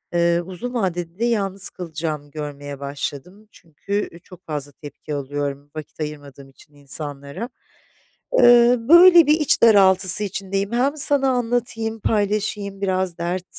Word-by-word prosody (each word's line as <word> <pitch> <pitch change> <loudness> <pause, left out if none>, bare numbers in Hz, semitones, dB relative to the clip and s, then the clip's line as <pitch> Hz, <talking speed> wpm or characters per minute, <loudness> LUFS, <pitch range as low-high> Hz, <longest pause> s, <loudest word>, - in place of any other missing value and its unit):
ııı, 170 0 +2
uzun 190 +7 -7
vadede 180 -5 -3
de 235 - +1
yalnız 200 -4 -1
kalacağımı 155 -4 -6
görmeye 145 -2 -7
başladım. 145 +8 -7
Çünkü, 165 +5 -10 0.2
ııı, 170 - -14
çok 180 0 -17
fazla 145 -2 -5
tepki 145 +1 -9
alıyorum 145 0 -5
vakit 155 0 -9
ayırmadığım 145 -2 -8
için 145 +2 -21
insanlara. 145 - -7 0.9
Iıı, 240 0 +5
böyle 345 -1 +8
bir 305 +2 +3
iç 300 - +1
daraltısı 190 -2 +5
içindeyim. 195 +1 -3
Hem 275 +5 0
sana 275 -2 +3
anlatayım, 230 -2 -2
paylaşayım 205 -1 -2
biraz 185 -2 -1
dert 175 +2 -3
185 Hz, 130 wpm, -21 LUFS, 150-225 Hz, 0.9 s, böyle